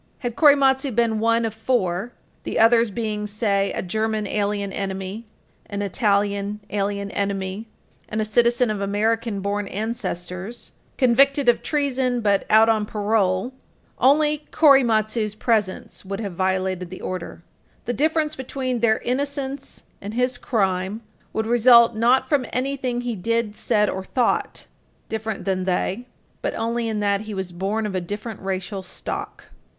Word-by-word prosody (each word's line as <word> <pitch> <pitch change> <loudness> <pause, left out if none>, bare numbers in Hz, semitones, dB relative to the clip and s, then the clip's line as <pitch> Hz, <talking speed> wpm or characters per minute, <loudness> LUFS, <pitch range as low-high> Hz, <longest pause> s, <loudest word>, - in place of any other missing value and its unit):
Had 240 -3 -4
Korematsu 280 -2 +4
been 230 -2 +2
one 230 +1 +2
of 220 - -3
four 220 -3 -1 0.3
the - - -4
others 230 0 +5
being, 210 -1 -3
say, 200 -2 0
a - - -3
German 215 +3 -1
alien 200 -1 -1
enemy, 195 +3 -4 0.4
an 200 0 -3
Italian 200 0 0
alien 200 0 -2
enemy, 200 +1 -3 0.4
and 215 - -2
a 215 - +1
citizen 235 +2 +2
of 205 -2 -3
American 215 +1 0
born 200 +1 -2
ancestors, 200 -1 -5 0.3
convicted 275 +2 +4
of 240 - +4
treason 260 -4 0
but 200 -3 +1
out 220 +1 +6
on 215 -2 +2
parole 205 +1 0 0.5
only 300 +2 +3
Korematsu's 225 -7 +3
presence 215 -4 -1
would 195 +1 -5
have 200 -4 -4
violated 185 0 -1
the 185 - -9
order. 180 -2 -6 0.4
The 245 - -1
difference 310 +2 +1
between 260 -2 -3
their 220 -1 +3
innocence 275 +1 -3 0.2
and 205 +2 -6
his 250 0 0
crime 190 -1 -1 0.3
would 220 - -2
result, 235 0 +6
not 240 +4 +3
from 285 -4 +1
anything 255 -2 -1
he 245 -2 -3
did, 225 +2 -1
said, 210 0 +1
or 190 -1 -3
thought, 245 +5 -1 0.4
different 220 -1 -4
than 185 -1 -1
they, 190 +5 -1 0.3
but - - -2
only 230 +1 -1
in 215 -2 -2
that 200 -1 +1
he 215 -1 -6
was 190 -2 -4
born 195 +5 -2
of 185 -4 -3
different 210 +2 -5
racial 190 +1 -4
stock. 185 - -6
220 Hz, 145 wpm, -23 LUFS, 200-240 Hz, 0.5 s, out